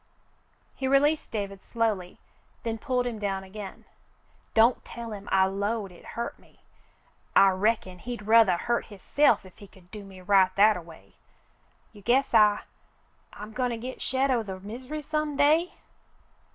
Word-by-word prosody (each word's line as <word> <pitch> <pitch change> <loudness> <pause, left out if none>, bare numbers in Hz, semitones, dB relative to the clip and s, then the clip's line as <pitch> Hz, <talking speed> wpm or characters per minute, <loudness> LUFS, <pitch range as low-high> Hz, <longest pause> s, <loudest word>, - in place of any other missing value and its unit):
He 265 - -2
released 290 +3 +2
David 200 -3 -5
slowly, 215 -6 -2 0.5
then 225 -1 -3
pulled 250 0 -1
him 235 -3 -4
down 195 -2 -2
again. 195 0 -9 0.7
"Don't 230 +2 +4
tell 230 -2 -8
him 200 -1 -9
I 190 0 +5
'lowed 200 +1 -2
hit 175 - -16
hurted 235 - -4
me. - - -25 0.7
I 195 - +7
reckon 190 -1 0
he'd 235 0 -7
ruthah 220 -5 +5
hurt 240 0 -1
hisself 210 +2 +2
if 185 - -16
he 200 - -12
could 180 -2 -21
do 210 -1 -8
me 195 -1 -12
right 190 0 +4
that 210 +2 +6
a 180 - -5
way. 165 -1 -16 0.8
You 205 - -14
guess 255 +5 +2
I 210 -2 +5 0.4
— - - -39
I'm 210 +1 -9
goin' 250 +1 0
to 235 - -3
git 250 +3 -7
shet 265 +1 +1
o' 245 -3 +2
the 190 -3 -7
misery 255 +9 -7
some 305 -1 -2
day 315 +5 +3
215 Hz, 165 wpm, -27 LUFS, 195-245 Hz, 0.8 s, I